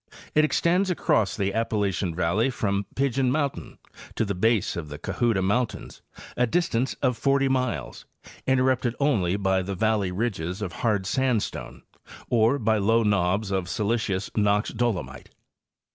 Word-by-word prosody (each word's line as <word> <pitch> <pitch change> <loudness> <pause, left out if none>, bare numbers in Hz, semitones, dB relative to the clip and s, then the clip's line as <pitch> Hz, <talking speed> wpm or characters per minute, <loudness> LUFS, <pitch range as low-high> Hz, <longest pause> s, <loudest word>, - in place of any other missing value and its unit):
It 155 - +4
extends 175 +5 +2
across 110 - +1
the 100 -1 -1
Appalachian 100 -6 -1
valley 90 +8 +1
from 100 -5 -1
Pigeon 135 -1 +1
mountain 145 -1 -2 0.4
to 115 - 0
the 100 - -2
base 110 +2 +1
of 80 -3 -5
the 75 - -7
Cohutta 115 0 0
mountains, 115 +5 -2 0.3
a 125 0 +2
distance 135 -5 0
of 125 -2 +2
40 135 -1 +2
miles, 115 - -2 0.4
interrupted 130 -2 +2
only 105 -11 +2
by 95 -2 +1
the 95 +1 -4
valley 105 -2 +1
ridges 95 -3 -2
of 90 -4 -4
hard 105 -3 0
sand 125 +1 +1
stone - - -7 0.5
or 120 +3 +3
by 110 -3 +1
low 115 +3 +3
knobs 100 0 +1
of 95 -2 -1
silicious 105 0 -1
Knox 105 0 +2
dolomite. 95 - -3
110 Hz, 145 wpm, -25 LUFS, 95-125 Hz, 0.5 s, It